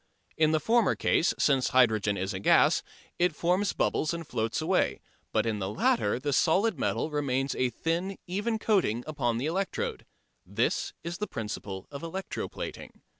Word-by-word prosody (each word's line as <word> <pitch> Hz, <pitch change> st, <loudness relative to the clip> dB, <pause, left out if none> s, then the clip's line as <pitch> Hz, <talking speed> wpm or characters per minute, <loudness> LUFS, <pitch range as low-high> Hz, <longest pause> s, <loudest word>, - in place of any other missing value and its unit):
In 155 Hz, -1 st, +3 dB
the 155 Hz, -, +3 dB
former 225 Hz, +5 st, +3 dB
case, 165 Hz, -, +2 dB
since 135 Hz, -3 st, +3 dB
hydrogen 110 Hz, -5 st, +3 dB
is 95 Hz, +2 st, -2 dB
a 95 Hz, -, -4 dB
gas, -, -, +4 dB, 0.4 s
it 175 Hz, -2 st, +2 dB
forms 180 Hz, +5 st, +1 dB
bubbles 155 Hz, +2 st, 0 dB
and 170 Hz, -1 st, -6 dB
floats 115 Hz, -5 st, -2 dB
away, 175 Hz, +4 st, +1 dB, 0.3 s
but -, -, +1 dB
in 110 Hz, -2 st, -1 dB
the 95 Hz, -1 st, -2 dB
latter 105 Hz, +1 st, +1 dB
the 145 Hz, +1 st, -1 dB
solid 185 Hz, -, +2 dB
metal 155 Hz, -, -1 dB
remains 135 Hz, -2 st, 0 dB
a 130 Hz, -, +1 dB
thin, 170 Hz, -, -2 dB
even 210 Hz, +5 st, -1 dB
coating 185 Hz, -, +1 dB
upon 135 Hz, -7 st, -1 dB
the 125 Hz, -, -2 dB
electrode. 195 Hz, -, -2 dB, 0.4 s
That -, -, -1 dB
is 170 Hz, +1 st, -5 dB
the 210 Hz, -, -2 dB
principle 105 Hz, -4 st, -5 dB
of 140 Hz, -1 st, -7 dB
electro 185 Hz, +3 st, -4 dB
plating. -, -, -8 dB
150 Hz, 170 wpm, -28 LUFS, 115-180 Hz, 0.4 s, gas